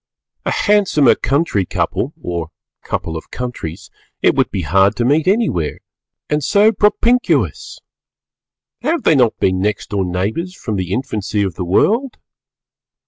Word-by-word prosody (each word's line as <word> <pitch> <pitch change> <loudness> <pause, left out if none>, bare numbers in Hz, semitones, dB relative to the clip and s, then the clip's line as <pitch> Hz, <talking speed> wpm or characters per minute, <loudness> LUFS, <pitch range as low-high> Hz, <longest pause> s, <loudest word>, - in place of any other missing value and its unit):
A - - +1
handsomer 200 -9 +3
country 140 - 0
couple 90 - -2
or 85 - -4 0.3
couple 80 - -4
of 80 - -7
countries 100 -7 -6 0.3
it - - +5
would - - +1
be 95 - -3
hard 95 +5 +3
to 120 - 0
meet 145 +6 +2
anywhere, 190 - +1 0.5
and 150 0 -1
so 205 +8 +4
propinquous! 235 +4 +1 1.0
Have 305 +3 -1
they - - +4
not 125 -6 +3
been 95 0 +1
next 105 +2 -2
door 100 -2 0
neighbours 105 - -3
from 110 - -4
the 90 -1 -3
infancy 105 -3 -1
of 95 -3 -2
the 90 - -5
world? 230 - +1
110 Hz, 140 wpm, -17 LUFS, -, 1.0 s, it